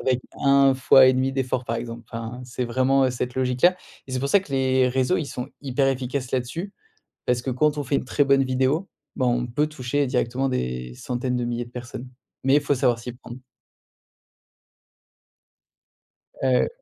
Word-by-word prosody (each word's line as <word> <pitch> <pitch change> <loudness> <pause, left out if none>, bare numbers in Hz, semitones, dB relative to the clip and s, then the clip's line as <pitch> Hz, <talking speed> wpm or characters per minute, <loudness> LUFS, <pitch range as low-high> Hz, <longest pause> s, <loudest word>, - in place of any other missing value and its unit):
avec 130 -2 +1 0.2
1 140 -1 +5
fois 130 0 +6
et 130 - +6
demi 130 +1 +1
d'efforts 130 -1 -1
par 115 -1 -2
exemple. 115 0 -6
Enfin, 115 +1 -6
c'est 125 0 -4
vraiment, 130 +3 +2
heu, 130 - +2
cette 125 0 -3
logique-là 130 +8 +3 0.3
et - - -8
c'est 130 - -1
pour 140 +2 -2
ça 200 - +5
que 185 - -15
les 130 -1 +2
réseaux, 130 +7 +1
ils 155 - -3
sont 125 -1 -6
hyper 135 0 0
efficaces 130 0 -2
là-dessus 145 +10 -3 0.5
parce 125 -1 +1
que 130 - -3
quand 150 +4 +1
on - - -2
fait 140 - -1
une - - -1
très 145 - +2
bonne 135 -1 +4
vidéo, 130 +8 0 0.3
bah, 130 - +1
on 120 0 +1
peut 145 +6 0
toucher 145 -1 -1
directement 125 +1 0
des 60 - -3
centaines 125 - -3
de 125 - -1
milliers 120 0 -3
de 120 - -16
personnes. 125 +1 -7 0.4
Mais, 135 +1 +4
il 145 - +4
faut 145 0 +1
savoir 125 -3 +2
s'y 125 +1 -6
prendre. 120 0 -11 3.0
Heu. 130 -2 +2
130 Hz, 190 wpm, -24 LUFS, 125-135 Hz, 3.0 s, fois